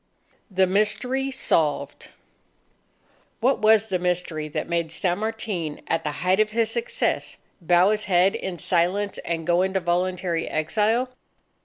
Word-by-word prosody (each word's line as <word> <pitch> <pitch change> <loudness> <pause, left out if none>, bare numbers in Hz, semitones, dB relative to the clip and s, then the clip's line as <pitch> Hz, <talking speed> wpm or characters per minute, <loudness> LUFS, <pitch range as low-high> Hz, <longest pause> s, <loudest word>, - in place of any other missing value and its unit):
THE 190 -1 +3
MYSTERY 215 +8 +1
SOLVED 160 - 0 1.3
What 260 +4 +2
was 220 0 +4
the 185 - 0
mystery, 175 -3 -2
that 150 - -3
had - - -10
made 170 -2 -1
San 180 +1 -1
Martin 210 -8 -3
at 165 - 0
the 150 - -2
height 185 +2 +3
of 215 0 +3
his 225 +1 0
success, 485 +1 -2 0.2
bow 175 +3 +4
his 215 0 -1
head 185 0 +3
in 185 -2 -4
silence 185 +5 0
and 165 -1 -4
go 175 +1 +3
into 190 +1 0
voluntary 175 -1 -1
exile? 220 +10 0
185 Hz, 145 wpm, -24 LUFS, 175-215 Hz, 1.3 s, was